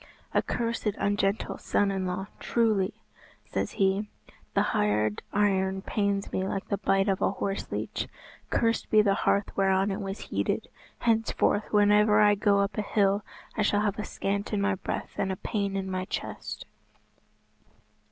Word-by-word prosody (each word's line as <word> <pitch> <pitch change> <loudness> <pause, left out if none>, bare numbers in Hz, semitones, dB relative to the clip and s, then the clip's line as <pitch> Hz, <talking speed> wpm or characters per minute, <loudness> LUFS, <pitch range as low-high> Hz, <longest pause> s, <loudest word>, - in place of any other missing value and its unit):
"A - - +4
cursed 230 -3 -2
ungentle 200 +1 0
son 200 -1 +1
in 190 -1 -2
law, 180 +2 -2
truly," 215 -4 +1 0.5
says - - -3
he, 195 +2 +1 0.5
"the - - +4
hard 105 0 +1
iron 190 -2 +1
pains 200 -2 -1
me - - -1
like 195 +1 -3
the 200 - 0
bite 195 +1 +2
of 195 -1 +1
a - - +3
horse 195 0 -3
leech. - - -3 0.4
Cursed 230 -1 +1
be 215 -1 +6
the 200 -1 +3
hearth 200 0 +1
whereon 195 0 +2
it 195 +2 -3
was 195 0 -4
heated! - - -1 0.3
Henceforth 225 -2 +1
whenever 210 0 +5
I 210 -1 +6
go 200 -1 +3
up 200 +1 -1
a - - +2
hill, 200 -1 +2 0.3
I - - 0
shall 205 0 +2
have 210 0 -1
a - - -1
scant 200 0 -2
in 205 - +1
my 200 0 +2
breath 190 - -4
and 195 -1 +1
a - - -1
pain 200 0 -2
in 190 -1 -3
my 185 0 -2
chest." - - -5
200 Hz, 165 wpm, -28 LUFS, 195-210 Hz, 0.5 s, be